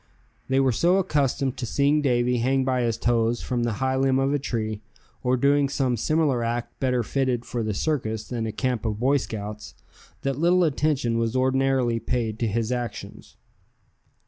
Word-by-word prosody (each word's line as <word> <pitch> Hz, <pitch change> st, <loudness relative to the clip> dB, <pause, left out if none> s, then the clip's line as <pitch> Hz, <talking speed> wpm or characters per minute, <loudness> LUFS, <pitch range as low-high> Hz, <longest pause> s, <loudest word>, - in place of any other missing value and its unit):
They 135 Hz, 0 st, +3 dB
were 135 Hz, -1 st, +3 dB
so 175 Hz, +10 st, +3 dB
accustomed 140 Hz, -7 st, 0 dB
to 125 Hz, -, -3 dB
seeing 145 Hz, +5 st, +2 dB
Davy 125 Hz, -2 st, +1 dB
hang 130 Hz, +2 st, +1 dB
by 130 Hz, -1 st, +1 dB
his 115 Hz, -2 st, 0 dB
toes 115 Hz, 0 st, +1 dB
from 125 Hz, -1 st, -1 dB
the 120 Hz, -1 st, 0 dB
high 130 Hz, +5 st, -1 dB
limb 135 Hz, 0 st, +2 dB
of 135 Hz, +1 st, +1 dB
a 145 Hz, -, +1 dB
tree, 110 Hz, -5 st, -3 dB, 0.4 s
or 125 Hz, 0 st, +1 dB
doing 140 Hz, +2 st, +3 dB
some 130 Hz, -3 st, 0 dB
similar 140 Hz, 0 st, +1 dB
act 120 Hz, +1 st, -3 dB
better 125 Hz, -2 st, +1 dB
fitted 125 Hz, -1 st, -1 dB
for 120 Hz, -, -3 dB
the 110 Hz, -2 st, -2 dB
circus 110 Hz, -6 st, -2 dB
than 115 Hz, -3 st, -3 dB
a -, -, -3 dB
camp 125 Hz, +1 st, -2 dB
of 110 Hz, -2 st, -2 dB
Boy 135 Hz, +4 st, +3 dB
Scouts, 105 Hz, -4 st, -6 dB, 0.5 s
that 135 Hz, 0 st, -1 dB
little 175 Hz, +2 st, +4 dB
attention 140 Hz, -6 st, +1 dB
was 115 Hz, +1 st, -1 dB
ordinarily 130 Hz, -2 st, +2 dB
paid 115 Hz, -3 st, -2 dB
to 115 Hz, -, 0 dB
his 115 Hz, +2 st, -1 dB
actions. 105 Hz, -, -5 dB
125 Hz, 180 wpm, -25 LUFS, 115-135 Hz, 0.5 s, little